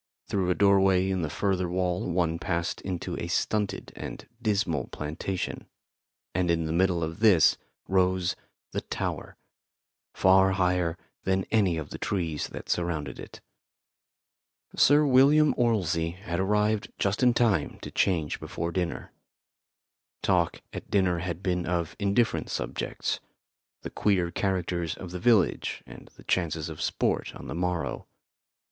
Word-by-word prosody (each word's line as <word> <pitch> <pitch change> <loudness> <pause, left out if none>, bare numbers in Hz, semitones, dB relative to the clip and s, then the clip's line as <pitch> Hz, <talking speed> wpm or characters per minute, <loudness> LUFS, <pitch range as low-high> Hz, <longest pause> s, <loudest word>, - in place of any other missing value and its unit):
Through 95 -3 -1
a 90 - +2
doorway 95 -1 +4
in 95 -1 0
the 80 - -2
further 95 +1 0
wall 90 0 -1
one 85 -2 0
passed 85 -2 -2
into 90 -2 -4
a - - -3
stunted 105 -2 -1
and - - -7
dismal 100 - 0
plantation, 80 +5 -4 0.7
and 90 0 0
in 85 -1 +1
the 80 - -2
middle 90 -1 +2
of 80 +1 -4
this 105 -7 +6 0.3
rose 95 -1 +2 0.4
the - - -2
tower, - - -4 0.8
far 95 0 +5
higher 90 -3 +1 0.3
than 95 0 +1
any 100 -7 +3
of 80 - -6
the - - -6
trees 85 -7 -2
that - - -9
surrounded 80 -6 -2
it. - - -10 1.3
Sir 145 +2 +5
William 140 +3 +5
Orlsey 90 -9 +1
had 90 -2 -4
arrived 105 +2 +1
just 100 +4 0
in 125 -2 +4
time 110 -11 +2
to - - -6
change 80 -6 0
before 85 0 -4
dinner. 90 -1 -3 1.1
Talk - - +1
at - - -7
dinner 90 -4 +2
had 85 +1 -4
been 90 -2 -1
of 85 -2 -1
indifferent 105 +3 +1
subjects - - -3 0.6
the - - -6
queer 90 -4 +1
characters 90 -3 -1
of 90 -2 -8
the 90 - -5
village 110 -1 +2
and - - -12
the - - -15
chances 80 -3 -1
of 80 - -7
sport - - -1
on - - -9
the - - -5
morrow. 90 0 -2
90 Hz, 140 wpm, -27 LUFS, 85-100 Hz, 1.3 s, this